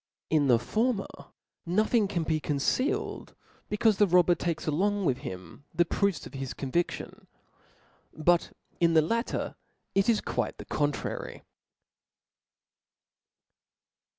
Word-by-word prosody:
In 150 -3 +3
the 120 -3 +6
former 215 - 0 0.6
nothing 215 +4 +2
carl 175 -4 -1
be 155 -1 +1
concealed, 150 - -1 0.3
becaufe 210 0 +3
the 205 - +5
robber 180 0 +5
takes 170 -2 -2
along 200 +6 +1
with 130 -4 +1
him 95 - -9
the 175 - +4
proofs 200 0 0
of - - -11
his 135 -1 -5
convidtion; 155 +6 -3 0.8
but 170 +2 +2 0.3
in 170 -1 +3
the 160 - +6
latter, 230 +9 -2 0.4
it 195 +3 +2
is 225 - +4
quite - - -2
the - - -9
contrary. 145 -1 -2
170 Hz, 120 wpm, -28 LUFS, 145-205 Hz, 0.8 s, the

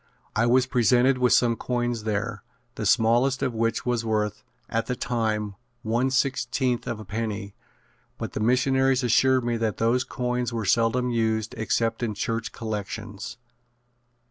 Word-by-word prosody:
I 115 +2 +3
was 125 +1 +4
presented 125 +1 +3
with 125 -1 +3
some 120 -2 +4
coins 120 -2 -2
there, 105 0 -2 0.3
the 110 -2 -2
smallest 120 +6 +3
of 130 -3 0
which 115 0 -1
was 120 -2 0
worth, 105 -1 -1 0.2
at 115 0 -1
that 125 - -3
time, 110 -4 -1 0.3
one 120 +4 +1
sixteenth 130 -1 0
of 115 -3 -3
a 110 - -9
penny, 105 -2 -4 0.6
but - - -5
the - - -3
missionaries 130 +3 +2
assured 130 +2 +3
me 120 -1 0
that 110 -2 -1
those 120 +3 +2
coins 125 -2 -2
were 115 -2 -3
seldom 115 +5 +2
used 110 -2 0
except 115 +1 0
in 110 -3 -2
church 115 +2 -2
collections. 105 -1 -5
115 Hz, 150 wpm, -25 LUFS, 110-125 Hz, 0.6 s, was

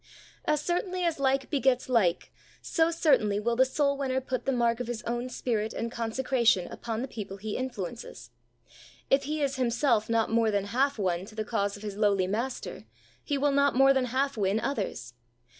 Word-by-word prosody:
As 300 -1 +1
certainly 360 +2 -1
as 335 -4 0
like 270 0 +1
begets 265 -3 +2
like, 210 -9 +1 0.3
so 325 -1 +1
cer 320 -4 +4
tainly 205 -1 -1
will 235 +2 0
the 260 +2 +5
soul 280 +2 +1
winner 265 -2 -1
put 255 -1 -4
the 270 - +1
mark 235 -2 +1
of 245 - -4
his 240 -1 -4
own 240 +2 -3
spirit 225 -4 -2
and 230 0 -3
consecration 235 -4 +1
upon 230 0 -4
the - - -3
people 200 -5 -7
he 210 +1 -5
influences; 240 -4 -6 0.8
if 270 0 +4
he 300 +1 -1
is 275 -1 -1
himself 235 -3 +1
not 225 -1 +1
more 225 -1 +3
than 200 -2 0
half 265 +6 +1
won 180 -3 0
to 215 - -14
the 215 -1 -3
cause 205 -2 -1
of 205 - -13
his 205 -2 -5
lowly 200 -3 +2
Master, 210 - -4 0.4
he 285 - -1
will 285 +1 +2
not 280 -1 +3
more 270 +1 +6
than 265 -1 +1
half 270 +3 0
win 200 +1 +1
others. 195 - -3
240 Hz, 195 wpm, -28 LUFS, 215-270 Hz, 0.8 s, more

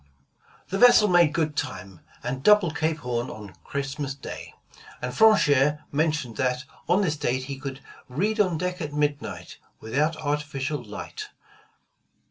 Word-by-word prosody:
The 195 - -2
vessel 240 -3 +7
made 175 -5 +5
good 155 -2 -1
time, 95 - -5 0.2
and 130 +2 -3
doubled 190 -2 +5
Cape 160 0 0
Horn 120 -1 -2
on 105 -3 -9
Christmas 140 0 -4
Day, 140 - -9 0.4
and 125 0 -4
Franchere 150 -9 +4
mentions 150 -5 0
that 125 0 0 0.2
on 185 +4 +4
this 160 -5 0
date 130 -3 -1
he 135 0 -6
could 135 0 -6 0.3
''read 210 - +2
on 180 -4 -2
deck 180 +2 -3
at 150 -2 -4
midnight, 145 -12 -2 0.2
without 150 +8 0
artificial 145 -1 -2
light." 425 -2 -7
150 Hz, 140 wpm, -25 LUFS, 130-165 Hz, 0.4 s, vessel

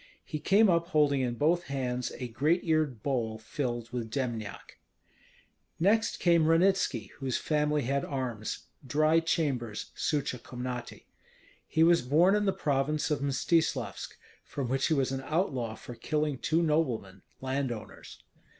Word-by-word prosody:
He 155 - -4
came 205 +7 +4
up 170 -2 +2
holding 150 -5 +3
in 120 -2 -1
both 170 +7 +2
hands 125 -3 -2
a 125 - -4
great 145 +10 +1
eared 155 - 0
bowl 115 -5 -1
filled 120 +1 -4
with 120 -2 -4
dembniak. 115 -5 -4 1.0
Next 210 +6 +2
came 170 -3 +4
Ranitski, 185 +4 +2
whose 135 -3 -1
family 150 -1 +1
had 140 +3 0
arms, 125 -6 -4 0.2
Dry 155 +4 +3
Chambers 135 -10 -1
(Suche 140 -4 -1
Komnaty). 125 -1 -6 0.6
He 160 - +3
was 170 +1 +5
born 160 +10 +4
in 210 0 +1
the 195 - +3
province 150 0 0
of 150 - +1
Mstislavsk, 140 - 0 0.3
from 135 -4 -4
which 135 +1 +1
he 160 - +2
was 135 -2 +1
an 135 0 -2
outlaw 135 - -1
for 120 - -9
killing 150 +1 -1
two 165 +4 +1
noblemen, 120 - 0 0.2
landowners. 130 -5 -5
140 Hz, 140 wpm, -30 LUFS, 125-160 Hz, 1.0 s, was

